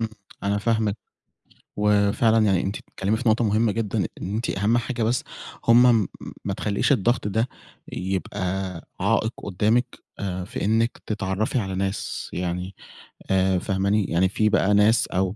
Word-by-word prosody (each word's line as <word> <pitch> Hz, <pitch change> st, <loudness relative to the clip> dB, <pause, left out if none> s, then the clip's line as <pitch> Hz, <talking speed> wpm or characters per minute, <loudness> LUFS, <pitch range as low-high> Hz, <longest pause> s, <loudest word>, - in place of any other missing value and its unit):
امم، 115 Hz, -, -1 dB, 0.3 s
أنا 100 Hz, +1 st, 0 dB
فاهمِك 110 Hz, -1 st, 0 dB, 0.8 s
وفعلًا 105 Hz, +2 st, +3 dB
يعني 95 Hz, -4 st, +3 dB
أنتِ 100 Hz, +2 st, -2 dB
بتتكلمي 100 Hz, +3 st, -2 dB
في 120 Hz, -1 st, +1 dB
نقطة 115 Hz, +2 st, +3 dB
مهمة 110 Hz, +1 st, +2 dB
جدًا 105 Hz, -2 st, -1 dB, 0.2 s
إن 100 Hz, +3 st, -3 dB
أنتِ 115 Hz, +2 st, -2 dB
أهم 105 Hz, +5 st, +1 dB
حاجة 120 Hz, 0 st, -2 dB
بس 120 Hz, +3 st, +1 dB, 0.4 s
هُم 115 Hz, -3 st, +6 dB, 0.4 s
ما 100 Hz, -, -1 dB
تخلّيش 100 Hz, +6 st, 0 dB
الضغط 120 Hz, -2 st, +2 dB
ده 110 Hz, +4 st, 0 dB, 0.4 s
يبقى 95 Hz, +2 st, -4 dB, 0.6 s
عائق 110 Hz, +3 st, +1 dB
قدّامِك 105 Hz, +5 st, +2 dB, 0.3 s
آآ 95 Hz, -2 st, -3 dB
في -, -, -4 dB
إنِك 115 Hz, +3 st, +1 dB
تتعرفي 110 Hz, +3 st, -1 dB
على 95 Hz, -3 st, -3 dB
ناس، 95 Hz, +1 st, -3 dB
يعني 90 Hz, +2 st, -3 dB, 0.6 s
آآ 95 Hz, -1 st, +3 dB
فاهماني؟ 100 Hz, +2 st, +1 dB
يعني 90 Hz, +3 st, +2 dB
في 105 Hz, +2 st, +1 dB
بقى 105 Hz, -1 st, +3 dB
ناس 105 Hz, +3 st, +4 dB
أو 95 Hz, +2 st, -1 dB
105 Hz, 150 wpm, -24 LUFS, 95-115 Hz, 0.8 s, هُم